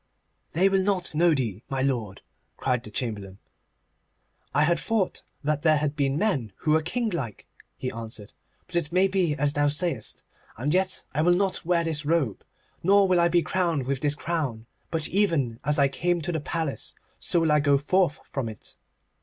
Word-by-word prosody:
'They 180 +5 +4
will 195 0 +3
not 185 -3 0
know 170 +2 +4
thee, 115 -7 -2
my 135 -1 -1
lord,' 120 -8 -2 0.3
cried 125 -3 0
the 110 - -9
Chamberlain. 105 -4 -4 1.2
'I 150 - +5
had 170 +2 +2
thought 220 -5 -1 0.2
that 150 0 0
there 155 -1 +4
had 145 0 -1
been 140 -2 +1
men 150 - 0
who 155 - -1
were 160 +1 +4
kinglike,' 170 - -3 0.3
he 130 - -3
answered, 110 -2 -8 0.3
'but 180 - -10
it 170 -3 0
may 185 +2 +4
be 185 -5 +1
as 145 0 +1
thou 145 0 +2
sayest. 145 -5 -3 0.3
And 140 +7 0
yet 185 0 +1
I 150 - +1
will 175 +2 +4
not 190 -2 0
wear 170 -1 +2
this 160 -2 -1
robe, 145 - 0 0.4
nor 200 +2 +5
will 180 -1 +3
I 170 - +5
be 170 0 +3
crowned 170 -7 0
with 135 0 -1
this 145 +1 +1
crown, 150 -9 -2 0.2
but 160 -2 -1
even 160 - +1
as 150 +1 +1
I 140 -1 +5
came 175 +5 0
to 175 - -2
the 160 - -1
palace 160 -1 -3 0.2
so 175 - +1
will 160 -2 +2
I 150 - +5
go 145 -1 +4
forth 165 +2 +1
from 130 -5 -3
it. 110 - -12
150 Hz, 190 wpm, -26 LUFS, 135-175 Hz, 1.2 s, I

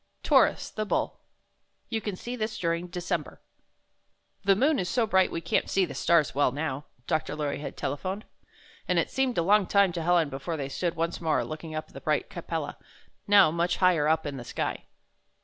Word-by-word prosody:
TAURUS, - - +3
THE 215 - -2
BULL 210 - -1 0.7
You 225 -1 -1
can 210 -3 -3
see 240 +6 -6
this 215 -2 -3
during 170 0 -1
December 175 +1 -3 1.0
"The 195 -1 +5
moon 275 +7 +3
is 180 -1 -2
so 235 +1 +2
bright 190 -3 +3
we 165 - -3
can't 165 - 0
see 195 -1 +3
the 150 - -8
stars 165 -4 +2
well, 140 -1 +3
now," 145 0 -3 0.2
Dr. 155 +4 -1
Lorry 150 -2 -2
had 145 - -7
telephoned, 185 +9 -3 0.6
and - - +1
it - - +1
seemed 265 -2 0
a 170 - +3
long 200 +1 +4
time 200 -2 +4
to 170 -1 -4
Helen 170 -2 +3
before 140 +5 -4
they 140 -2 -4
stood 170 +4 -2
once 165 +1 -2
more, 160 -2 +1
looking 155 0 -7
up 155 - -4
at - - -21
the - - -9
bright - - 0
Capella, - - -4 0.5
now 200 -5 +7
much 170 +2 0
higher 175 -5 +3
up 160 0 +2
in 145 -2 -4
the 120 - -6
sky. - - -3
170 Hz, 200 wpm, -28 LUFS, 155-195 Hz, 1.0 s, now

